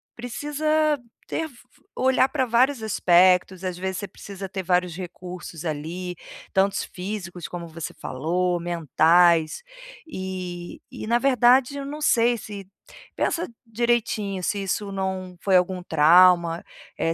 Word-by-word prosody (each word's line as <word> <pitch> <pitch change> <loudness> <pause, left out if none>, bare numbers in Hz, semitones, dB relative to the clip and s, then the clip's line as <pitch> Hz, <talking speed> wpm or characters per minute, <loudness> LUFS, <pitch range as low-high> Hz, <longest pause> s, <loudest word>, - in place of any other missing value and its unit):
precisa 295 +4 0 0.3
ter 325 - -2
f 300 - -11
f 250 +2 -23
olhar 260 0 +3
pra 265 -3 0
vários 245 +2 +2
aspectos, 185 -2 +3
às 180 -1 -3
vezes 190 0 -3
você 205 - -5
precisa 195 -1 -9
ter 190 0 -4
vários 180 -1 +1
recursos. 180 -2 -8
ali, 170 +4 -4 0.4
tantos 195 +1 +2
físicos 180 -3 -6
como 170 -1 -7
você 165 0 -7
falou 175 +6 -1
"mentais", 170 - +3 0.5
eh 185 - -6
e 255 - -7
na 235 +1 +3
verdade 255 +1 +4
eu 275 - -5
não 295 +2 -6
sei 235 -3 +3
se 200 -2 -8 0.5
pensa 340 0 0 0.2
direitinho 225 -4 -1
se 200 +2 -1
isso 200 +1 -2
não 190 -1 -3
foi 190 -2 +4
algum 180 0 0
trauma, 170 +1 +5 0.3
é 165 - 0
190 Hz, 135 wpm, -24 LUFS, 175-240 Hz, 0.5 s, trauma